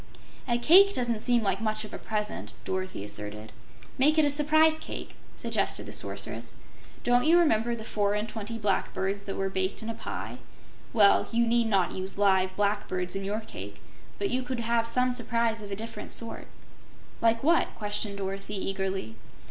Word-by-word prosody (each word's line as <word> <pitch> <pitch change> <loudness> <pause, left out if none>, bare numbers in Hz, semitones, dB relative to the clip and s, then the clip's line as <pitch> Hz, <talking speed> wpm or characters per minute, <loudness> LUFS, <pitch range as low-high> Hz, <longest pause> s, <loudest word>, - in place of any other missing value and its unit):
"A 240 -1 +2
cake 380 +11 +7
doesn't 235 -3 -1
seem 240 -1 +2
like 200 - 0
much 215 -1 -1
of 210 - -11
a - - -5
present," 210 -1 -3
Dorothy 185 - -3
asserted. 105 +1 -5 0.5
"Make 300 +4 +4
it 310 - +6
a 290 - +2
surprise 310 +2 +4
cake," - - -7 0.2
suggested - - -1
the - - -8
Sorceress. - - -5 0.5
"Don't 245 +2 +3
you 335 +2 +7
remember 240 -8 +3
the 225 - -7
four 205 -2 0
and 210 +1 -1
twenty 220 +1 -5
blackbirds 195 -1 -1
that 200 -1 -5
were 195 - -1
baked 190 +3 -1
in 225 - -3
a - - -5
pie? - - -6 0.5
Well, 205 -3 +5
you 235 0 +3
need 235 0 +2
not 195 -5 +2
use 190 +1 -4
live 190 -2 +3
blackbirds 200 -3 -1
in 195 - -3
your 205 +3 -2
cake, 220 - -9 0.4
but 395 - -1
you 255 - +1
could 250 -1 -3
have 230 0 +1
some 250 +2 +2
surprise 230 -2 0
of 205 - -8
a 195 - -3
different 225 +2 -6
sort." 230 -1 -4 0.7
"Like 230 +1 +3
what?" 330 +3 +4
questioned 205 -1 -2
Dorothy, 195 +1 -4
eagerly. 190 - -3
215 Hz, 180 wpm, -28 LUFS, 195-240 Hz, 0.7 s, cake